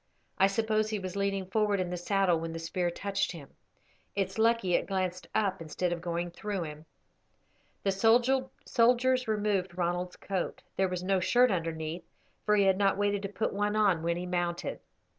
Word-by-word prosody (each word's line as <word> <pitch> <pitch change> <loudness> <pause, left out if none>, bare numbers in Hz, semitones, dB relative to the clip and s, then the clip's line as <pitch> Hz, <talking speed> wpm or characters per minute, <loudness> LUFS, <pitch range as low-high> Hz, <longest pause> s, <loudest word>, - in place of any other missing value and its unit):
I 195 - +6
suppose 215 +1 +1
he 215 - -1
was 185 -2 -5
leaning 200 -1 -1
forward 205 +1 +1
in 180 -1 -2
the - - -1
saddle 180 -1 +2
when 165 0 -4
the - - -4
spear 175 +2 -1
touched 195 +2 -2
him. 145 -5 -11 0.6
It's 195 +1 -2
lucky 225 -5 +3
it - - +2
glanced 185 -2 -2
up 205 -5 +1
instead 170 +2 -2
of 170 - -5
going 175 0 -2
through 200 0 -3
him." 155 0 -8 1.0
The 195 - +2 0.7
soldiers 250 +1 +3
removed 205 -4 0
Ronald's 175 0 -1
coat. 190 -3 -4
There 190 -1 +1
was 180 0 -3
no 190 0 +2
shirt 245 +6 +4
underneath, 165 -1 -3 0.4
for 210 - +5
he 200 - +4
had 190 0 +3
not 195 -1 +3
waited 205 0 +1
to 195 - -4
put 220 +2 -2
one 205 +1 0
on 200 -6 +3
when 170 +1 0
he 180 - -4
mounted. 175 -1 -2
190 Hz, 180 wpm, -30 LUFS, 175-205 Hz, 1.0 s, I